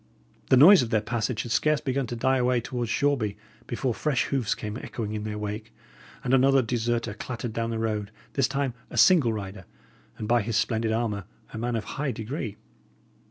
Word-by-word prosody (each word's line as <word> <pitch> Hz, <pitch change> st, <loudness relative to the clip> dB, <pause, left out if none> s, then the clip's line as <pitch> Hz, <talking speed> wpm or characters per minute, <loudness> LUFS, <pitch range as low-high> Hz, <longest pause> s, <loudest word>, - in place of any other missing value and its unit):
The 130 Hz, -, +6 dB
noise 180 Hz, +8 st, +9 dB
of 120 Hz, -, -2 dB
their 110 Hz, -2 st, +3 dB
passage 110 Hz, +1 st, -2 dB
had 120 Hz, -, -7 dB
scarce 150 Hz, +4 st, +2 dB
begun 135 Hz, -1 st, -1 dB
to 120 Hz, -, -4 dB
die 130 Hz, +3 st, +2 dB
away 125 Hz, 0 st, +2 dB
towards 120 Hz, 0 st, -4 dB
Shoreby, 120 Hz, -7 st, +1 dB, 0.3 s
before 125 Hz, 0 st, -1 dB
fresh 145 Hz, +2 st, 0 dB
hoofs 130 Hz, -7 st, 0 dB
came 105 Hz, 0 st, -5 dB
echoing 110 Hz, -4 st, -5 dB
in 105 Hz, 0 st, -4 dB
their 105 Hz, -1 st, -4 dB
wake, 105 Hz, +1 st, -5 dB, 0.5 s
and 125 Hz, -, 0 dB
another 135 Hz, 0 st, +5 dB
deserter 115 Hz, -1 st, -1 dB
clattered 120 Hz, +1 st, -5 dB
down 115 Hz, 0 st, -1 dB
the 115 Hz, -, -2 dB
road; 105 Hz, -2 st, -2 dB, 0.2 s
this 135 Hz, -2 st, +2 dB
time 135 Hz, -2 st, -1 dB, 0.2 s
a -, -, -7 dB
single 160 Hz, -11 st, +6 dB
rider 100 Hz, -3 st, -6 dB, 0.5 s
and, 110 Hz, -3 st, -5 dB
by 120 Hz, +1 st, +3 dB
his 110 Hz, 0 st, -1 dB
splendid 110 Hz, 0 st, 0 dB
armour, 110 Hz, -4 st, -1 dB, 0.3 s
a 110 Hz, -, -5 dB
man 120 Hz, +1 st, -1 dB
of 110 Hz, -, -1 dB
high 140 Hz, +6 st, -3 dB
degree. 110 Hz, -1 st, -5 dB
115 Hz, 195 wpm, -26 LUFS, 110-130 Hz, 0.5 s, noise